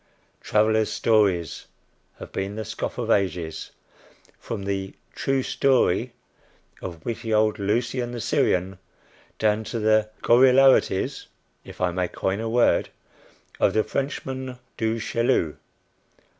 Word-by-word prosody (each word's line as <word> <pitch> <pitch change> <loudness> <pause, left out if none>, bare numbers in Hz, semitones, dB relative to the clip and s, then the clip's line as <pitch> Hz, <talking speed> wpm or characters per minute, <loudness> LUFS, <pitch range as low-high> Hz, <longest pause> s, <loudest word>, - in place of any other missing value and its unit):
"Travellers' 110 0 +2
stories" 100 -8 +1 0.5
have - - -10
been 95 +1 -3
the 110 0 -4
scoff 110 - -5
of 115 -2 -1
ages, 90 -5 -1 0.7
from 105 -4 -5
the 95 -1 -3 0.2
"True 135 -1 0
Story" 135 -1 +1 0.7
of 85 -3 -8
witty 115 -1 -4
old 110 0 +2
Lucian 120 +4 -1
the 120 - -5
Syrian 95 -3 0 0.6
down 110 0 +1
to 115 +2 -4
the 110 -1 +2
gorillarities 130 -4 +4 0.4
if - - -12
I 90 -1 +1
may 90 0 -1
coin 95 +3 -2
a 115 0 -3
word 120 +1 +3 0.7
of - - +3
the 110 - +2
Frenchman 130 -2 -4 0.2
Du 110 0 -1
Chaillu. 115 - 0
110 Hz, 120 wpm, -24 LUFS, 95-120 Hz, 0.7 s, gorillarities